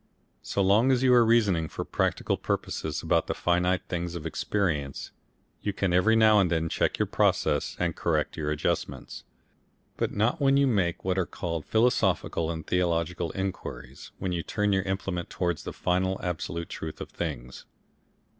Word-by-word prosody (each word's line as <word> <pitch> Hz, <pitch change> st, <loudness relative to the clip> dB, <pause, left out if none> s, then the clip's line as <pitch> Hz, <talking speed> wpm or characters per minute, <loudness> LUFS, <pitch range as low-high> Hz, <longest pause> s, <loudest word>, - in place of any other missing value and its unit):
So 100 Hz, -, -1 dB
long 105 Hz, +7 st, +4 dB
as 130 Hz, 0 st, +2 dB
you 130 Hz, -1 st, +5 dB
are 120 Hz, -1 st, +7 dB
reasoning 105 Hz, -8 st, +3 dB
for -, -, -5 dB
practical -, -, 0 dB
purposes -, -, -3 dB
about -, -, +2 dB
the -, -, -2 dB
finite 90 Hz, +1 st, +1 dB
things 85 Hz, -1 st, -3 dB
of 85 Hz, -2 st, -6 dB
experience, 80 Hz, -5 st, -2 dB, 0.5 s
you 100 Hz, -, -2 dB
can 95 Hz, -2 st, 0 dB
every 105 Hz, +6 st, +4 dB
now 110 Hz, -1 st, +6 dB
and 95 Hz, -3 st, +3 dB
then 80 Hz, -1 st, 0 dB
check -, -, 0 dB
your -, -, +1 dB
process, -, -, +1 dB
and 85 Hz, -2 st, 0 dB
correct 75 Hz, -3 st, 0 dB
your 75 Hz, -2 st, -2 dB
adjustments. 75 Hz, -1 st, -3 dB, 0.7 s
But -, -, -1 dB
not 120 Hz, +9 st, 0 dB
when 135 Hz, 0 st, +4 dB
you 140 Hz, -, +4 dB
make 95 Hz, -11 st, 0 dB
what 95 Hz, 0 st, +1 dB
are 90 Hz, -, 0 dB
called 85 Hz, -3 st, -4 dB
philosophical 110 Hz, -7 st, +1 dB
and 80 Hz, -2 st, -4 dB
theological 85 Hz, -1 st, 0 dB
inquiries, 70 Hz, -9 st, -5 dB
when 95 Hz, -1 st, -3 dB
you 85 Hz, -1 st, -1 dB
turn 105 Hz, +3 st, 0 dB
your 95 Hz, -, +2 dB
implement 95 Hz, -2 st, -3 dB
towards 85 Hz, -3 st, -2 dB
the -, -, -4 dB
final 95 Hz, +1 st, 0 dB
absolute 85 Hz, -1 st, -3 dB
truth 80 Hz, -1 st, -6 dB
of -, -, -7 dB
things. 65 Hz, -7 st, -5 dB
90 Hz, 170 wpm, -27 LUFS, 85-100 Hz, 0.7 s, are